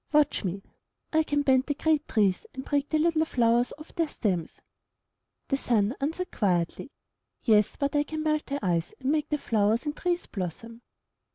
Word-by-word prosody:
Watch 300 -5 +3
me! 195 +1 -3 0.5
I 315 - +5
can 290 -2 0
bend 260 -1 +3
the 290 - 0
great 310 0 +1
trees 205 - +1
and 265 - -6
break 285 -1 0
the 310 - +2
little 320 0 +3
flowers 240 -4 +2
off 305 +1 -13
their 330 -1 0
stems/' 185 - -2 0.9
The 275 - +2
Sun 230 -3 +1
answered, 325 +6 -2
quietly, 180 +4 0 0.5
'*Yes, 215 -4 +4
but 280 +1 -1
I 290 - +4
can 310 +1 -4
melt 305 -1 0
the 280 - -2
ice 170 -2 0
and 265 +1 0
make 305 -1 0
the 300 - +1
flowers 220 0 +1
and 295 0 -2
trees 350 +1 -1
blossom." 225 +5 -6
275 Hz, 180 wpm, -27 LUFS, 215-305 Hz, 0.9 s, I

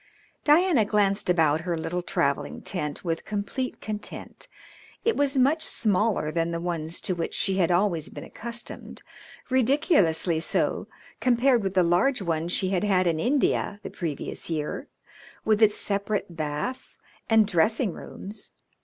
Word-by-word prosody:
Diana 310 - +4
glanced 205 -2 +1
about 160 -3 +3
her 170 -1 -2
little 175 +2 -3
travelling 140 -5 -1
tent 150 -3 -3
with 165 -1 -2
complete 215 +5 -3
content. 210 -1 -5 0.6
It 460 - +3
was 280 -1 +1
much 280 +5 +3
smaller 210 - +1
than 165 +1 0
the 170 0 -3
ones 170 -1 -2
to 185 - 0
which 170 -2 -3
she 190 -1 +1
had 175 -3 +2
always 175 -3 +1
been - - -9
accustomed, 235 +1 -5 0.5
ridiculously 245 - +3
so 160 - 0 0.3
compared 250 0 +3
with 195 -1 -3
the 185 - +5
large 180 +11 +2
one 165 -4 -1
she 185 +1 0
had 190 0 0
had 190 -3 +2
in 165 -2 +1
India 245 - +1
the - - -6
previous 160 -2 -4
year, 155 -2 -3 0.6
with 215 0 +2
its 210 -1 +5
separate 200 -3 -1
bath 155 +11 -4 0.3
and 225 -1 +5
dressing 200 +3 +1
rooms. 205 +3 -7
195 Hz, 145 wpm, -26 LUFS, 170-230 Hz, 0.6 s, the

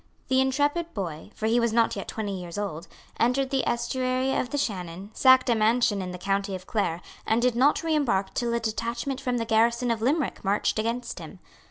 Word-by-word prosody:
The 260 0 +4
intrepid 290 +5 0
boy, 170 -4 -5
for 220 - -4
he 230 +2 +3
was 235 -1 +1
not 230 0 +2
yet - - -5
twenty 210 -3 -4
years 175 +1 -7
old, 185 -5 -4 0.3
entered 260 +3 +2
the 270 -2 +1
estuary 255 +2 0
of 245 - -1
the 290 - -2
Shannon, 190 -5 -4
sacked 260 -1 +5
a 240 - +4
mansion 220 -1 +2
in 185 - -4
the 180 - -6
county 195 +1 -1
of 185 0 -8
Clare, 180 -6 -1 0.3
and 220 - +3
did 245 0 +2
not 275 +7 +3
reimbark 275 -12 +1
till 240 -1 -1
a - - +1
detachment 235 +4 -3
from 250 -2 -1
the 230 - -1
garrison 235 +2 +2
of 225 -1 -2
Limerick 280 +4 0
marched 205 +2 +1
against 235 +2 -2
him. - - -10
235 Hz, 205 wpm, -26 LUFS, 205-260 Hz, 0.3 s, sacked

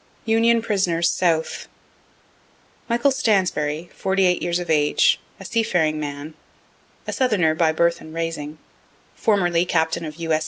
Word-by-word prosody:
UNION 230 +1 +3
PRISONERS 180 -6 +1
SOUTH 165 -3 -1 1.2
Michael 240 +4 +2
Stansbury, 175 - 0
48 190 -2 +1
years 175 0 0
of 175 -1 -5
age, 150 -1 +3 0.2
a - - -10
seafaring 175 -10 0
man, 145 +1 -6 0.7
a - - -4
southerner 205 -12 +2
by 160 0 +2
birth 170 +1 +1
and 155 - -11
raising, 160 -2 -4 0.6
formerly 175 -6 +1
captain 160 -2 0
of 155 -2 -6
U. 165 -1 -2
S. 155 - +2
170 Hz, 130 wpm, -22 LUFS, 160-195 Hz, 1.2 s, UNION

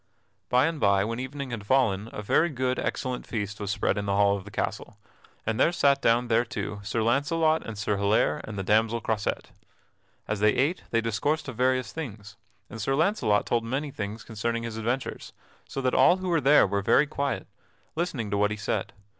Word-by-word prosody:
By 125 +2 +4
and 165 -1 -2
by, 100 -3 +3
when 115 +2 -3
evening 135 +1 -5
had 105 -4 -6
fallen, 110 -5 +2
a 105 - -6
very 160 +11 +3
good, 130 -3 -1
excellent 125 -2 -3
feast 105 -2 -4
was 100 -2 -4
spread 100 0 0
in 100 - -4
the 100 - +1
hall 100 0 +4
of 100 -1 -7
the - - -9
castle, - - -4 0.5
and 110 0 -1
there - - +4
sat 140 -5 +3
down 120 +2 +3
thereto 115 -3 -1
Sir 110 +2 -1
Launcelot 155 +6 +2
and 115 -2 -7
Sir 105 0 -1
Hilaire 100 +2 +2
and 110 -1 -7
the 95 - -2
damsel 110 +3 +2
Croisette. 110 -2 -2 0.8
As 105 -1 -2
they 105 +1 +3
ate 150 +7 +1
they 115 - +1
discoursed 115 +9 -1
of 130 - -7
various 130 +1 +1
things, 105 -9 -7 0.3
and 115 - -8
Sir 135 +6 0
Launcelot 155 - +2
told 115 -1 0
many 135 +5 -3
things 105 -1 -5
concerning 115 +1 -3
his 115 -1 -5
adventures, 120 +4 -3 0.4
so 135 - -4
that 130 -1 0
all 180 - +5
who 185 -1 -4
were 165 -3 +2
there 145 +2 +6
were 100 0 -1
very 140 +8 +4
quiet, 140 -1 -2 0.5
listening 145 - -2
to 100 - +1
what 105 0 +3
he 105 - -4
said. 105 -1 -2
115 Hz, 205 wpm, -27 LUFS, 105-135 Hz, 0.8 s, there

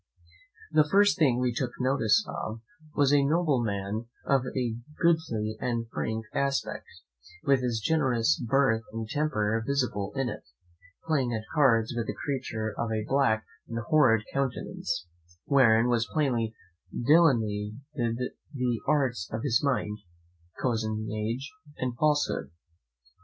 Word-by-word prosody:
The 155 - +5
first 200 +1 +4
thing 135 -7 +4
we 125 -1 +1
took 125 0 -2
notice 115 -5 +3
of 110 +1 -5 0.3
was 145 -1 +3
a 145 -1 +5
nobleman 120 - 0 0.2
of 135 -1 +3 0.2
a 120 -3 0 0.2
goodly 115 -11 +1
and 115 -2 -1
frank 110 0 -2
aspect, 140 0 -1 0.6
with 135 -2 +3
his 120 -3 -1
generous 120 - +1
birth 125 -2 +2
and 115 -1 -4
temper 115 -6 0
visible 120 -7 -1
in 135 -2 0
it, - - -5 0.6
playing 135 -7 +1
at 110 - -3
cards 120 -7 +3
with 120 -1 -2
a - - -2
creature 115 -6 -2
of 115 -1 -2
a 110 -1 -1
black 135 -6 +2 0.2
and 115 - -5
horrid 115 -2 +3
countenance, 130 -9 -2 0.4
wherein 115 -5 +5
were 120 -1 +2
plainly 120 -6 0 0.5
delineated 120 -3 +2 0.4
the 125 -4 -1
arts 130 -10 +1
of 110 +1 -3
his 120 -5 +2
mind, 120 -7 0 0.6
cozenage, 110 +1 -2 0.3
and 125 -2 -2
falsehood. 145 - +1
120 Hz, 125 wpm, -28 LUFS, 110-140 Hz, 0.6 s, The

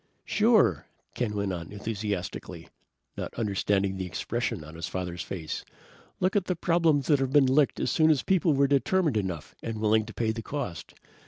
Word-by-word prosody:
"Sure!" 210 - +3 0.3
Ken 110 -4 -2
went 100 -2 -1
on 85 -1 -6
enthusiastically, 105 -3 -4 0.5
not - - -5
understanding 100 -3 0
the 95 - -3
expression 115 +2 -3
on 75 +1 -11
his 85 +1 -5
father's 90 -1 -4
face. 85 -5 -5 0.6
"Look 185 +2 +1
at 200 -3 +2
the 180 - -1
problems 165 -4 +2
that 145 -3 +3
have 135 -1 0
been 145 -1 +6
licked 135 +2 +3
as - - 0
soon 160 -1 +4
as 150 -5 +3
people 180 -4 +3
were 140 +1 +4
determined 145 +2 +2
enough 95 -7 -3
and 115 -1 -4
willing 110 0 +3
to 115 - -8
pay 110 -2 0
the 115 +1 -5
cost. 110 -11 -5
115 Hz, 180 wpm, -28 LUFS, 95-145 Hz, 0.6 s, been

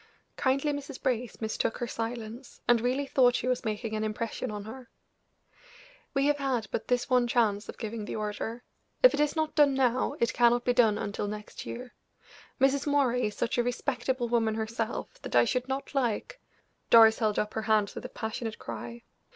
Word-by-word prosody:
Kindly 275 +3 +1
Mrs. 285 -1 -6
Brace 245 -4 -2
mistook 220 +1 -1
her 240 - -2
silence, 230 +1 -6
and 240 -2 +5
really 255 +4 0
thought 250 -3 +4
she 250 - -1
was 255 -1 0
making 220 +1 -3
an 215 - -1
impression 225 +3 -3
on 210 -1 -5
her. 240 +3 -10 1.3
"We 275 0 +3
have 290 0 +2
had 260 -5 0
but - - -3
this 245 -1 +1
one 250 -2 +3
chance 220 -3 +1
of - - -7
giving 220 -2 -5
the - - -5
order; 215 +3 -4 0.4
if - - +8
it - - -1
is 295 +1 +2
not 315 -1 0
done 285 -3 +4
now, 260 +1 +1
it 235 - +1
cannot 240 0 +3
be 245 - +3
done 225 -4 +4
until 205 0 -3
next 210 0 -7
year. 245 +1 -7 0.7
Mrs. 275 +2 +2
Moray 255 -5 +2
is 210 - -6
such 240 +1 -1
a - - +3
respectable 245 0 -1
woman 225 -2 +1
herself 225 0 -4
that - - -5
I 120 0 +6
should 250 - -1
not 270 +2 -4
like 260 - -1 0.2
" - - -45
Doris 225 -1 +7
held 215 -3 +1
up 210 - -1
her 220 - -2
hands 215 -2 +2
with - - -7
a - - -6
passionate 220 0 -4
cry. 115 +1 -7
240 Hz, 195 wpm, -29 LUFS, 220-260 Hz, 1.3 s, if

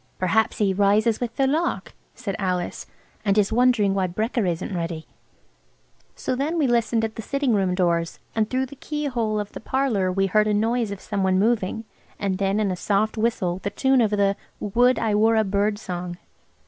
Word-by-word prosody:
"Perhaps 205 +4 +1
he 200 -3 +2
rises 205 +3 +3
with 235 -2 -4
the 270 - +2
lark," 315 +6 -1 0.2
said 200 -6 -4
Alice, 180 -2 -2 0.4
"and 200 -1 +1
is 210 +1 +2
wondering 240 -5 +3
why 190 -1 +1
brekker 215 +3 -1
isn't 175 +2 -2
ready." 165 -2 -4 1.1
So - - -2
then 295 +6 -1
we 305 - +2
listened 230 -2 +2
at 220 - -7
the - - -3
sitting 275 +2 0
room 190 -3 +1
doors, 170 -2 0 0.2
and 220 -1 0
through 260 +1 0
the 265 - -12
keyhole 245 -9 -2
of 205 -1 -4
the - - -8
parlour 225 -8 0
we 195 +1 +1
heard 210 +3 +2
a 210 - +2
noise 225 +1 +1
of 200 -1 -6
some 205 -2 -3
one 190 -1 +2
moving, 220 0 +1 0.3
and 195 -1 -2
then 195 +1 +1
in 205 -3 +1
a - - -1
soft 205 +4 0
whistle 215 -6 0
the 200 - -2
tune 265 +4 +2
of 220 - +3
the 200 -1 +2 0.2
"Would 245 +5 +3
I 220 -2 0
were 220 +2 +4
a 220 - +4
bird" 205 +1 0
song. 180 -3 -5
210 Hz, 200 wpm, -24 LUFS, 195-235 Hz, 1.1 s, were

